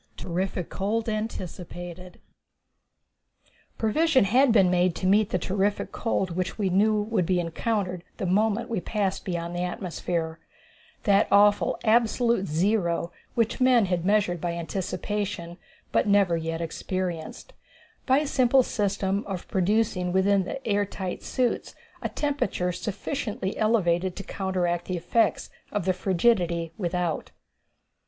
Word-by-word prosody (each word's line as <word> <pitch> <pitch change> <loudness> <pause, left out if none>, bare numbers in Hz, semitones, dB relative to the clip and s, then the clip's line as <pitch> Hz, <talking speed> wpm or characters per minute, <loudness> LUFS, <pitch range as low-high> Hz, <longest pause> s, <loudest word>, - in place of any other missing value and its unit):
Terrific 180 0 -3
Cold 220 +4 -1
Anticipated. 180 -4 -5 1.6
Provision 270 +5 +3
had 245 +6 +4
been 195 -5 +5
made 180 -1 +2
to - - -4
meet 200 +2 +4
the - - +1
terrific 195 +3 -1
cold 195 -5 -1
which 185 +1 -3
we 200 -4 0
knew 210 +3 +3
would 210 -5 0
be 185 -1 +2
encountered 180 +1 -2
the - - -3
moment 215 +5 +1
we 230 - -2
had 175 - -13
passed 200 -3 -1
beyond 170 -2 -3
the 175 - -2
atmosphere 175 -2 -3 0.6
that 200 -2 +4
awful 205 0 +4
absolute 230 -2 +2
zero 170 +1 0 0.2
which 230 +2 0
men 250 -4 +5
had 180 -2 -1
measured 195 -3 +2
by 175 -1 -1
anticipation, 185 0 -3 0.3
but - - +2
never 200 -4 +4
yet 165 0 -3
experienced 175 - -4 0.5
by 260 0 +5
a 300 - +1
simple 260 -1 +4
system 200 -2 -1
of 190 -3 -5
producing 190 -2 +1
within 190 +1 +3
the 270 +7 -6
air 205 -1 +2
tight 190 -2 -5
suits 250 -2 -1 0.3
a - - -2
temperature 280 -11 -1
sufficiently 205 +2 -3
elevated 185 -5 +1
to 195 - -6
counteract 180 -3 -1
the 185 - -2
effects 225 +7 +1 0.2
of 205 -4 -2
the 185 - +3
frigidity 175 -3 +1
without. 175 -4 -2
190 Hz, 135 wpm, -26 LUFS, 175-215 Hz, 1.6 s, been